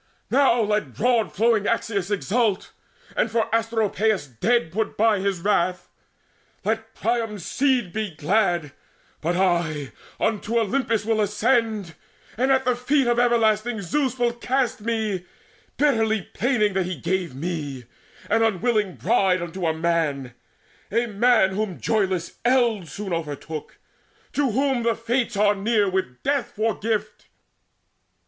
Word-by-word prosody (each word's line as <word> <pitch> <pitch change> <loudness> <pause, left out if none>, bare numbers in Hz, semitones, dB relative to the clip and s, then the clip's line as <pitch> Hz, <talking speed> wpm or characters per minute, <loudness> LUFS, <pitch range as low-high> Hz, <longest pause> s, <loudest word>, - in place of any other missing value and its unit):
Now 260 -3 +4
let 210 -1 -1
broad 235 -2 +2
flowing 220 0 +2
Axius 205 -5 -1
Exult, 210 0 0 0.4
and - - +1
for 225 0 0
Asteropaeus 220 -3 +1
dead 160 - 0
Put 220 +5 -2
by 220 -1 +3
his 195 -2 -1
wrath! 180 -2 0 0.8
Let 225 +1 -2
Priam's 225 -5 -2
seed 255 -9 +1
be 215 -1 -2
glad 175 -2 +1 0.5
But 170 +3 0
I 170 -6 0 0.3
unto 225 +1 0
Olympus 225 -1 0
will 220 -1 +1
ascend, 210 -3 +1 0.4
And 260 +4 +1
at 265 -1 +3
the 250 -1 +2
feet 270 +3 +1
of 240 0 +2
everlasting 225 -2 +2
Zeus 260 - 0
Will 240 -1 +1
cast 250 0 -1
me, 215 -4 -1 0.5
bitterly 225 -8 +2
planning 215 -4 +1
that 190 -2 0
he 185 - -3
gave 175 -4 -2
Me, 145 -5 -4 0.4
an 225 +2 +2
unwilling 215 -2 +1
bride, 185 -2 +2
unto 175 0 -3
a - - +3
man 160 -6 -1 0.6
A 230 +3 +2
man 220 -2 +3
whom 195 -2 -3
joyless 190 -6 -1
eld 240 -7 +2
soon 195 +4 -5
overtook, 155 -1 -5 0.6
To 285 -2 +1
whom 265 +2 +1
the 230 0 +1
Fates 235 -1 -1
are 205 0 +4
near, 205 +1 +1
with 185 -10 -3
death 280 -2 0
for 220 +1 +1
gift. 220 0 -3
215 Hz, 135 wpm, -23 LUFS, 185-235 Hz, 0.8 s, Now